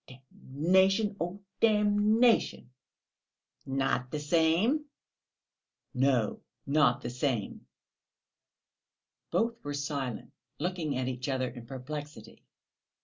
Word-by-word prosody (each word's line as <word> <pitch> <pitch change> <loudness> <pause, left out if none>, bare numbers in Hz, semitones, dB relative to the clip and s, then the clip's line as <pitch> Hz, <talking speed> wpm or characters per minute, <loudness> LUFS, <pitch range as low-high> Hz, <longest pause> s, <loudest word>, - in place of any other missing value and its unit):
(Oh, 130 - -11 0.3
damnation, 190 +8 +3 0.4
damnation!)." 210 - +3 1.0
"Not 135 -2 0
the 150 - -3
same?" 170 - +2 1.1
"No, 125 -4 +1 0.3
not 140 -3 +3
the - - -4
same." 125 -4 -2 1.6
Both 230 0 -1
were 145 0 -4
silent, 140 -4 -4 0.2
looking 165 -4 -2
at 130 -1 -1
each 125 +1 -3
other 130 -1 0
in 120 -1 -11
perplexity. 135 -2 -8
145 Hz, 85 wpm, -30 LUFS, 130-190 Hz, 1.6 s, damnation